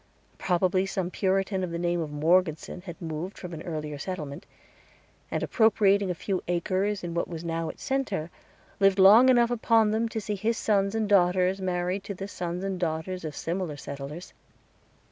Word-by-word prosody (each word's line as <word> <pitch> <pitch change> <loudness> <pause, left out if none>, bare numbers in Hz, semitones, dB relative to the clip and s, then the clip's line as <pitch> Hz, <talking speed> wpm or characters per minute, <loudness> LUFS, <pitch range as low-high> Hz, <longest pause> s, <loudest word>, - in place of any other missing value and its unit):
Probably 185 +1 +1
some 185 -2 -2
Puritan 190 0 0
of 180 - -2
the 170 - -4
name 175 0 0
of 155 -2 -4
Morgeson 160 +2 +1
had 175 -3 -9
moved 165 +3 -5
from 180 -2 -8
an 160 - -6
earlier 150 -3 -5
settlement, 150 -5 -6 0.8
and, - - -2
appropriating 205 -3 +3
a 180 - -1
few 185 +2 -2
acres 185 +3 0
in 170 -1 -4
what 170 - -1
was 165 -1 -7
now 165 -1 -2
its - - -9
center, 210 - -2 0.5
lived 195 -1 +4
long 210 +7 +8
enough 240 -2 +4
upon 225 -2 +3
them 225 +1 0
to 220 - -3
see 210 0 -3
his 220 +3 -1
sons 200 -1 +1
and 220 -1 0
daughters 185 -1 +3
married 180 +1 -1
to 200 - -5
the 195 +2 -6
sons 180 -1 -4
and 195 -2 -3
daughters 170 +2 -2
of 155 -2 -5
similar 170 -3 -3
settlers. 140 +5 -8
185 Hz, 180 wpm, -27 LUFS, 170-200 Hz, 0.8 s, long